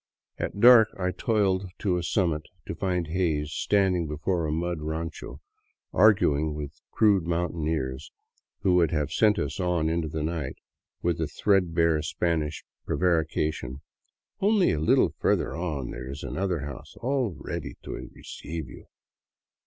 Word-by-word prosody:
At - - -3
dark 120 -1 +8
I 90 -1 0
toiled 100 -3 0
to 95 -4 0
a - - -1
summit 85 -3 0 0.2
to - - -4
find 90 -3 -1
Hays 80 -3 -1
standing 95 -2 +1
before 80 +3 -1
a - - -1
mud 85 +1 -2
rancho 80 -4 -5 0.5
arguing 80 -7 +4
with 75 -2 -5
the - - -33
crude 100 -5 +3
mountaineers 80 -5 -2 0.5
who 95 - +3
would 85 -3 +4
have 75 -3 -1
sent 105 -1 +3
us 70 +3 -3
on 90 -3 +1
into 80 -1 -1
the 75 0 -3
night 80 -4 -3 0.5
with 85 -1 0
the 80 - 0
threadbare 85 -2 +2
Spanish 80 -1 -1 0.2
prevarica 80 -2 +1
tion, 65 +2 -7 0.3
" - - -62
Only 205 -1 +4
a 75 - -1
little 80 - +3
further - - +1
on 80 -7 -3
there 65 - -7
is 70 +2 -7
another 90 -4 -2
house 70 -3 -8
all 125 -6 -1
ready - - -5
to - - -7
re - - -9
ceive 80 -3 -6
you." - - -13
85 Hz, 155 wpm, -27 LUFS, 75-95 Hz, 0.5 s, dark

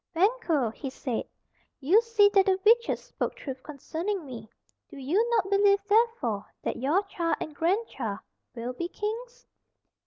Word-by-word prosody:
"Banquo," 340 - +2
he 270 - -6
said, 255 -2 -3 0.5
"you 350 +11 +5
see 460 -3 +4
that 395 -1 +4
the 380 -1 +4
witches 470 +2 +4
spoke - - -4
truth 265 -2 -7
concerning 320 +6 -4
me. 230 -5 -9 0.4
Do - - -11
you 355 - +1
not 415 -5 +1
believe, 400 0 +5
therefore, 410 - +1 0.2
that - - -2
your 300 +10 +1
child 340 -4 -1
and 310 - -5
grandchild 325 - -1 0.4
will 240 +1 -4
be 340 +7 -3
kings?" 465 +6 -5
365 Hz, 150 wpm, -28 LUFS, 270-425 Hz, 0.5 s, you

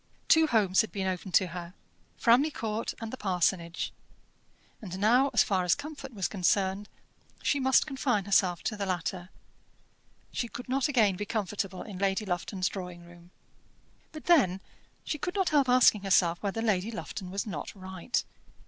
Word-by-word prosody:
Two 320 0 +5
homes 205 -7 +3
had 220 - -5
been 195 -2 -3
open 185 0 -3
to 190 - +5
her, 175 +1 -8 0.4
Framley 245 +6 +4
Court 225 -6 -3
and 225 0 -6
the - - -4
parsonage; 180 -4 -1 0.9
and 185 -4 -6
now, 240 +7 +4
as - - +5
far 190 -3 0
as 180 - +3
comfort 285 -2 -8
was 195 -6 -2
concerned, 195 +1 0 0.5
she 285 - +1
must 265 0 +4
confine 265 -8 -1
herself 185 -3 +2
to 215 - -2
the 200 -1 -3
latter. 180 0 -3 1.0
She 240 - -2
could 245 +2 -8
not 270 +2 +1
again 220 -9 +3
be 210 - -3
comfortable 200 -3 -3
in 195 -4 -8
Lady 195 +2 0
Lufton's 185 +1 -2
drawing 180 -3 -7
room. 175 0 -16 0.8
But 310 - -10
then 250 - +4 0.4
she 300 - -3
could 360 +6 -3
not 385 -3 +1
help 285 -4 +3
asking 250 -4 +5
herself 180 -3 +2
whether 210 +2 -2
Lady 210 -2 +1
Lufton 200 -4 -6
was 195 +2 -3
not 170 -9 -5
right. 190 +3 -3
200 Hz, 165 wpm, -29 LUFS, 185-245 Hz, 1.0 s, Two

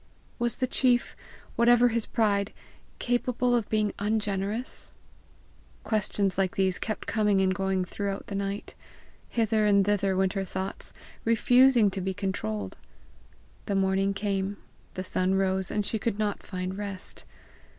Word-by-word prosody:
Was 240 -1 +1
the 255 - 0
chief, 250 -1 +2 0.4
whatever 240 +1 +5
his 230 -1 -1
pride, 205 -2 +1 0.4
capable 245 0 +1
of 230 -3 -1
being 215 -1 +1
ungenerous? 210 +2 -1 0.9
Questions 200 -3 0
like 190 -2 +1
these 190 -1 +1
kept 215 - -3
coming 210 -3 +2
and 190 -1 +3
going 190 -1 0
throughout 200 +1 -4
the - - -7
night. 200 +1 -3 0.6
Hither 220 -2 +2
and 200 -1 +4
thither 200 -2 +1
went 190 0 +2
her 195 -2 -1
thoughts, 190 +1 -5 0.3
refusing 240 -1 +5
to 190 - -4
be 190 +1 -2
controlled. 110 - -3 0.9
The 200 - 0
morning 195 +1 +1
came, 200 0 -1 0.4
the 185 - -3
sun 185 0 0
rose, 190 -1 +1
and 210 -1 -1
she 220 - -1
could 210 -1 -1
not 210 -2 -1
find 185 +1 -5
rest. 200 -2 -6
200 Hz, 140 wpm, -28 LUFS, 190-220 Hz, 0.9 s, whatever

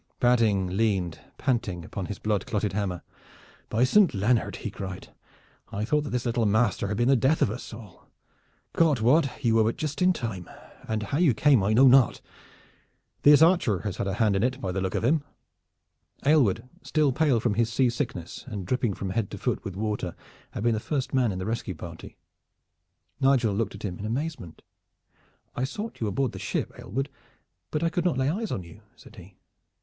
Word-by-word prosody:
Badding 110 -7 +2
leaned 95 -6 0 0.2
panting 95 -9 -1
upon 95 +1 -5
his 105 - -5
blood 105 -2 -1
clotted 105 -2 -1
hammer. 95 -4 -2 0.7
"By 115 +3 +2
Saint 180 - +4
Leonard!" 110 +4 +1
he 105 - -5
cried, 95 -3 -7 0.6
"I 105 +2 -2
thought 150 +5 +1
that - - -4
this 125 0 -2
little 115 -2 +1
master 105 -1 +1
had 105 +1 -2
been 120 +1 +2
the 135 - +5
death 130 +6 +2
of 105 - +1
us 120 - -7
all. 110 -6 -12 0.7
God 155 -6 +3
wot 130 +4 +2
you 115 - +4
were 110 0 +4
but 115 +2 0
just 155 +3 -4
in 180 0 +5
time, 110 - -5 0.4
and 110 -1 -1
how 140 +9 -2
you 155 -10 +4
came 140 -2 +4
I 100 +3 +1
know 130 +5 +6
not. 130 -2 +5 1.0
This 145 +1 +7
archer 165 - +3
has 105 -2 -4
had 100 - -2
a 95 - -1
hand 105 -2 +2
in 95 - +1
it, 130 +3 0
by 95 -7 -3
the 95 +1 -2
look 95 0 -2
of - - -1
him." 145 +5 +2 1.0
Aylward, 135 -8 +3
still 150 -3 +1
pale 140 -3 +2
from 110 -1 0
his 115 +2 +1
seasickness 120 - -1
and 105 -6 -5
dripping 120 -1 0
from 95 -1 -4
head 100 0 -1
to - - -7
foot - - -2
with 95 - -6
water, 105 -4 -3 0.4
had - - -4
been 120 -1 +3
the 110 - -1
first 135 +3 -3
man 125 -4 +2
in 95 - -4
the 95 - -4
rescue 110 -4 -3
party. 85 +1 -10 1.0
Nigel 135 -6 +3
looked 105 0 -2
at 100 - -11
him 90 -3 -5
in 100 - -5
amazement. 125 - -4 0.9
"I 125 - -2
sought 210 - -5
you 110 - 0
aboard 125 +4 0
the - - -8
ship, - - -3
Aylward, 135 +8 -3 0.6
but 155 +1 -2
I 165 - +2
could 175 0 -1
not 175 -7 +1
lay 130 +1 +1
eyes 215 +4 -3
on 95 - -3
you," 85 +5 -14
said 115 - -16
he. 95 0 -14
115 Hz, 200 wpm, -26 LUFS, 100-135 Hz, 1.0 s, This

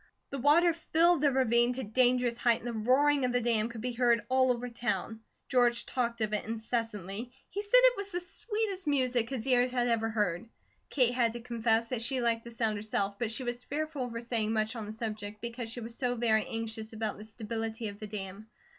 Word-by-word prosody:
The 275 - -3
water 325 +6 +5
filled 335 0 +2
the 290 -2 +4
ravine 240 -2 +3
to 260 +1 -4
dangerous 245 +2 +2
height 235 -1 +2
and 240 - -8
the 240 - -3
roaring 265 +6 +3
of 250 - +1
the 245 - +3
dam 230 -2 +1
could 235 -2 -8
be 250 +2 -2
heard 235 -2 +2
all 260 0 +4
over 245 0 -2
town. 235 -2 -3 0.3
George 240 -2 +2
talked 235 -3 -2
of 215 -1 0
it 210 - 0
incessantly. 225 -1 -4 0.2
He 405 - -2
said 415 +4 +4
it - - +6
was 400 0 -4
the 355 - -1
sweetest 400 0 -3
music 255 -5 +1
his 260 -5 -4
ears 250 -1 +3
had 245 -1 0
ever 225 -1 +1
heard. 210 -1 -1 0.4
Kate 250 -4 +3
had 235 -2 +2
to 240 - -6
confess 230 -1 0
that 250 -3 -2
she 260 +3 0
like 230 -1 +1
the 235 - -9
sound 225 -2 -1
herself, 205 -2 -2
but 235 - -1
she 245 +3 -3
was 240 0 -4
fearful 305 0 -3
over 230 -2 -4
saying 230 -2 -1
much 220 +1 0
on 220 -3 -5
the - - -5
subject 215 -2 -5
because 235 +1 -5
she 240 +1 -4
was 230 +1 -7
so 245 -1 -1
very 225 -2 +2
anxious 225 -1 -4
about 220 -2 -3
the - - -8
stability 225 +1 -4
of 200 0 -10
the 215 - -6
dam. 200 0 -7
235 Hz, 220 wpm, -30 LUFS, 220-255 Hz, 0.4 s, it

